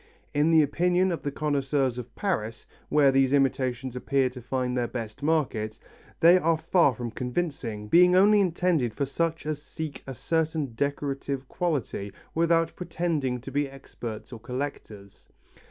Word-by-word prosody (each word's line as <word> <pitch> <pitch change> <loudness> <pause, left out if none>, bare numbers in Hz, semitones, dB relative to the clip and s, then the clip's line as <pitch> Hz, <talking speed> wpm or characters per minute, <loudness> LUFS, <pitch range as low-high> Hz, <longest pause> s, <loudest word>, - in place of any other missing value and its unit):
In 145 +2 +3
the 160 -2 +6
opinion 180 +5 +2
of 170 - -3
the 145 - -2
connoisseurs 140 -3 0
of 125 - -9
Paris, 115 - -2 0.2
where 145 -2 +5
these 135 0 +3
imitations 130 -2 0
appear 135 +1 +1
to 125 0 -10
find 125 +1 -2
their 120 -1 0
best 115 +1 -6
market, 135 -9 0 0.4
they 175 +3 +7
are 165 -1 +2
far 160 -4 +3
from 120 0 -5
convincing, 125 -5 -3
being 180 +8 +6
only 205 +2 +6
intended 170 - +1
for 140 - 0
such 165 +4 -2
as 150 -1 -3
seek 155 -2 -6
a 135 - -6
certain 160 -2 -1
decorative 140 0 -2
quality 135 - -2 0.2
without 165 0 +2
pretending 165 -7 -2
to 135 - -8
be 145 +1 0
experts 120 -4 -8
or 115 - -8
collectors. 120 -5 -7
140 Hz, 155 wpm, -27 LUFS, 125-165 Hz, 0.4 s, they